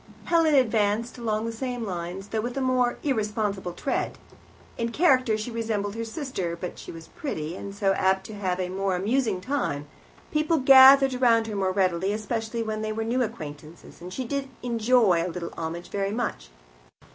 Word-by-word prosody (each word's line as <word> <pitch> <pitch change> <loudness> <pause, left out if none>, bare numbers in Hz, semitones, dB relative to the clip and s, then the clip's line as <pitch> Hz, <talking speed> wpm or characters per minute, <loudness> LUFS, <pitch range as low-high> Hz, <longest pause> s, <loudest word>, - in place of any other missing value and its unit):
Helen 330 -3 +3
advanced 230 -1 +1
along 220 -1 -1
the 230 - -2
same 245 0 -4
lines, 180 +1 -5
though 220 - -1
with 240 +3 -4
a - - +1
more 255 -2 +1
irresponsible 210 - -1
tread. 270 - -2 0.6
In 230 0 -2
character 255 -7 +3
she 215 +3 -5
resembled 220 -3 -2
her 230 +1 -4
sister, 225 - -4
but 180 - -6
she - - -8
was 165 -1 -11
pretty, 165 - -5
and 200 +1 -7
so 195 -1 +2
apt 190 0 +1
to 220 - -8
have 190 -3 -2
a 180 -1 -2
more 190 0 -1
amusing 215 +1 0
time. 185 - -2 0.5
People 310 +2 +2
gathered 270 0 +8
round 230 -2 +4
her 215 -2 -5
more 190 -1 0
readily, 185 0 +1
especially 220 +2 -3
when 215 -1 -3
they 215 0 -2
were 225 +1 -2
new 240 +3 0
acquaintances, 160 - -7
and 180 +1 -8
she 255 +7 -4
did 275 +2 -3
enjoy 230 -6 +3
a 180 - -2
little 170 0 -6
homage 170 +1 -5
very 195 0 -2
much. 205 - -3
215 Hz, 180 wpm, -26 LUFS, 190-245 Hz, 0.6 s, gathered